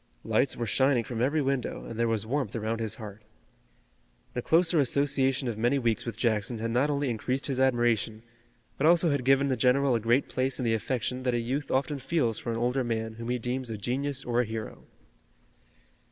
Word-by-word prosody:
Lights - - +1
were 120 - -2
shining 130 +3 +2
from 115 0 -4
every 145 +4 +2
window, 135 -2 -2
and 115 -1 -7
there 115 - +2
was 110 -2 -1
warmth 130 -2 -2
around 115 0 -2
his 110 -2 -2
heart. 105 -2 -9 1.1
The 125 - -2
closer 165 +3 +3
association 135 -1 +1
of 110 -3 -3
many 120 +5 +2
weeks 120 -3 0
with 115 - -4
Jackson 115 0 0
had 115 +1 -3
not 130 +5 +2
only 145 -1 0
increased 125 +4 -2
his 135 -2 -1
admiration, 120 -4 +1 0.6
but 150 - +3
also 170 -1 +5
had 140 -3 0
given 135 +2 +3
the 130 - +2
general 130 +2 +3
a 115 - +2
great 120 +5 +2
place 130 +1 -1
in 125 - -2
the 115 - +2
affection 125 +3 -2
that 125 -1 0
a - - +1
youth 130 +5 -3
often 140 +2 0
feels 130 -5 0
for - - -6
an 115 - -1
older 125 +3 0
man 115 -1 -2
whom 115 - -5
he 125 - +1
deems 125 +1 -3
a 110 - -4
genius 130 +6 -2
or 120 0 +2
a - - -1
hero. 110 0 -7
125 Hz, 210 wpm, -28 LUFS, 115-135 Hz, 1.1 s, also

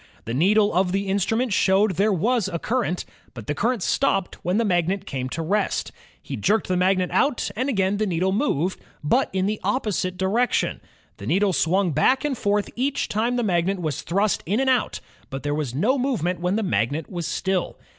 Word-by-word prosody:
The 115 - -4
needle 205 - +3
of 180 +1 +1
the 195 +1 0
instrument 205 +5 0
showed 195 +3 +3
that 175 - -8
there 210 +3 +3
was 215 +3 +1
a 170 - -3
current, 225 -2 -1 0.3
but 115 -3 -8
the 150 - -1
current 230 - 0
stopped 195 -8 0
when 180 +3 0
the 230 - +2
magnet 185 +1 0
came 130 -1 -4
to 165 +5 -3
rest. 205 +6 -1 0.3
He - - -6
jerked 220 +2 +1
the 185 - 0
magnet 185 0 +2
out, 275 -7 +1
and 255 +6 -1
again 195 -4 +1
the 215 0 0
needle 185 +1 0
moved, 190 - 0 0.2
but 245 - +2
in 190 0 0
the 210 +1 -1
opposite 190 -7 -1
direction. 215 +7 0 0.4
The - - -8
needle 195 0 +2
swung 180 +2 +2
back 255 - +2
and 290 -3 0
forth 205 -2 0
each 265 +3 -1
time 230 +4 0
the 245 - 0
magnet 185 -1 +1
was 155 -5 -2
thrust 200 +4 0
in 205 +6 +1
and 265 0 +3
out, 255 - 0 0.3
but 135 -1 -6
there 145 0 -1
was 145 -5 -3
no 250 - +2
movement 185 - -1
when 180 +3 0
the 220 - 0
magnet 145 - -1
was 170 -3 -4
still. 185 +2 -1
195 Hz, 205 wpm, -23 LUFS, 175-220 Hz, 0.4 s, needle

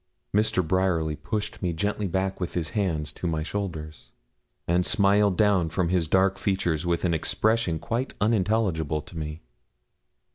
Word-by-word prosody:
Mr. 105 -5 +2
Bryerly 85 -4 +1
pushed 105 +9 -4
me 90 -3 0
gently 100 +4 -1
back 95 +1 -1
with 90 -2 -4
his 80 -3 -1
hands 80 -7 -1
to 90 - -5
my 80 -2 -1
shoulders, 80 -5 -5 0.6
and 85 +1 +3
smiled 100 0 +3
down 100 -6 +3
from 85 +2 0
his 90 -3 +1
dark 95 +3 +2
features 90 -4 0
with 85 +1 0
an 85 - +2
expression 110 +2 +1
quite 120 - -3
unintelligible 95 -8 +1
to - - -14
me. 75 0 -5
90 Hz, 150 wpm, -26 LUFS, 80-100 Hz, 0.6 s, and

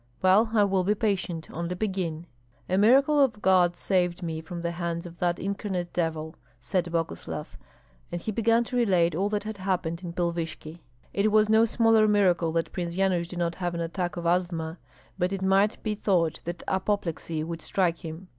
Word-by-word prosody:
"Well, 200 +5 +5
I 215 -2 +4
will 195 -2 +2
be 205 +3 +2
patient, 190 -6 -1
only 170 +2 -3
begin." 180 -5 -3 0.4
"A 185 - 0
miracle 270 +9 +5
of 230 -6 0
God 185 -3 +4
saved 180 -2 0
me 160 -1 -3
from 170 +1 -7
the 170 - -1
hands 170 0 -3
of 170 0 -11
that 175 -1 +1
incarnate 195 -3 -3
devil," 160 -2 -2 0.2
said 170 +8 -1
Boguslav; 160 - -4 0.6
and 175 - -3
he 215 - -3
began 230 +2 +2
to 245 - -6
relate 185 -8 +3
all 195 +6 0
that 210 -1 -1
had 215 -1 -6
happened 185 -3 -2
in 170 -1 -5
Pilvishki. 170 -2 -3 0.3
It 205 +2 +2
was 215 0 +4
no 220 +1 +5
smaller 225 -1 +4
miracle 180 -5 +3
that 165 0 -1
Prince 175 -2 -4
Yanush 185 -3 +1
did 180 - -8
not 170 -1 0
have 175 -1 -1
an 170 - -2
attack 175 +1 -3
of 170 - -5
asthma, 170 -2 0 0.4
but 180 +1 +1
it 195 -1 -3
might 195 +3 +3
be 215 - 0
thought 180 -6 +1
that 175 +1 -5
apoplexy 180 -5 -1
would 165 0 -5
strike 175 -2 0
him. 165 +3 -8
180 Hz, 190 wpm, -27 LUFS, 170-200 Hz, 0.6 s, Well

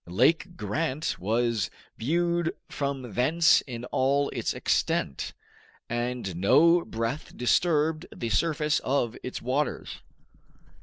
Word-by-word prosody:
Lake 160 - +2
Grant 140 +8 -2
was 115 +1 0 0.3
viewed 170 +5 0
from 135 -5 -3
thence 160 +7 +4
in 120 -2 -6
all 140 +3 +1
its - - -2
extent, 70 - -1 0.5
and 120 -5 -3
no 155 - +5
breath 115 +6 -4
disturbed 155 +4 +2
the 115 - -4
surface 155 +2 +1
of 125 -4 0
its 125 - -6
waters. 135 +5 -2
135 Hz, 105 wpm, -27 LUFS, 120-160 Hz, 0.5 s, no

